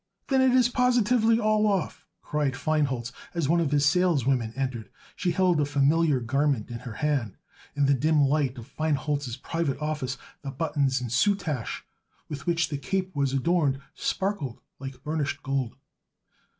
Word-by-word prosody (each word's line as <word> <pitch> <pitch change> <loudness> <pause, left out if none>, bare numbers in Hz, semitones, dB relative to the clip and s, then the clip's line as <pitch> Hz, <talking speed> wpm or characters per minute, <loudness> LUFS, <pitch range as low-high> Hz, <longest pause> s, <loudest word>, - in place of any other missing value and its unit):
"Then 265 -1 +4
it 260 -1 +4
is 250 -2 +5
positively 245 -2 +3
all 215 -1 +3
off," 195 -5 -1 0.2
cried 150 -3 0
Feinholz 135 -5 0 0.2
as 165 -5 0
one 170 +3 +3
of 165 -4 +1
his 145 0 +2
saleswomen 140 -8 +2
entered. 130 -6 -3 0.3
She 185 - -1
held 175 -2 +2
a - - +3
familiar 145 +1 +3
garment 130 0 0
in 120 - -5
her 120 -2 -8
hand, 135 -7 -1 0.4
and 145 -1 +2
in 140 - +5
the 135 - -1
dim 155 +2 +3
light 140 -2 +1
of 115 - -8
Feinholz's 145 -4 -2
private 165 -5 -2
office 150 -4 -2 0.2
the 140 - -5
buttons 135 -2 0
and 120 -3 -4
soutache 150 - 0 0.4
with 150 +1 -7
which 170 -1 +1
the 145 -2 -3
cape 185 +5 -2
was 140 -2 +1
adorned 140 0 +1
sparkled 190 - -2 0.2
like 135 -1 -8
burnished 150 -2 -2
gold. 135 -4 -2
145 Hz, 165 wpm, -27 LUFS, 135-170 Hz, 0.4 s, is